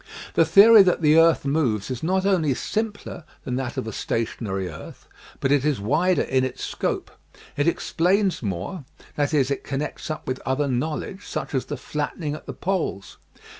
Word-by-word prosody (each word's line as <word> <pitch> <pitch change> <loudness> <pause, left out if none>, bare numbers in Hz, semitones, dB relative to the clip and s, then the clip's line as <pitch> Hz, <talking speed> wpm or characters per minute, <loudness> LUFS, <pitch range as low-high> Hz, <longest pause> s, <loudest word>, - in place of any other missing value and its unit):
The 165 - +4
theory 205 +7 +8
that 180 -3 +2
the 155 +1 +6
earth 165 -3 +4
moves 130 -7 0
is 125 - -4
not 185 +3 0
only 165 -9 +2
simpler 210 - -4 0.2
than 125 - -3
that 130 -2 -4
of - - -2
a 110 - -5
stationary 105 -5 -3
earth, 80 -3 -11 0.3
but 135 - 0
it 145 -2 +3
is 150 -5 +1
wider 160 - +2
in 130 0 +1
its 130 - -4
scope. - - -3 0.4
It 145 +2 0
explains 185 +3 +1
more, 100 - -4 0.3
that 145 -1 0
is, 140 -3 +2
it 140 - -2
connects 145 +3 -4
up 155 - -5
with 130 0 -2
other 135 +2 0
knowledge, 155 +9 -3
such - - -4
as 130 - 0
the - - -5
flattening 150 +1 -4
at 155 - -9
the - - -5
poles. 175 - -3
150 Hz, 180 wpm, -24 LUFS, 130-175 Hz, 0.4 s, theory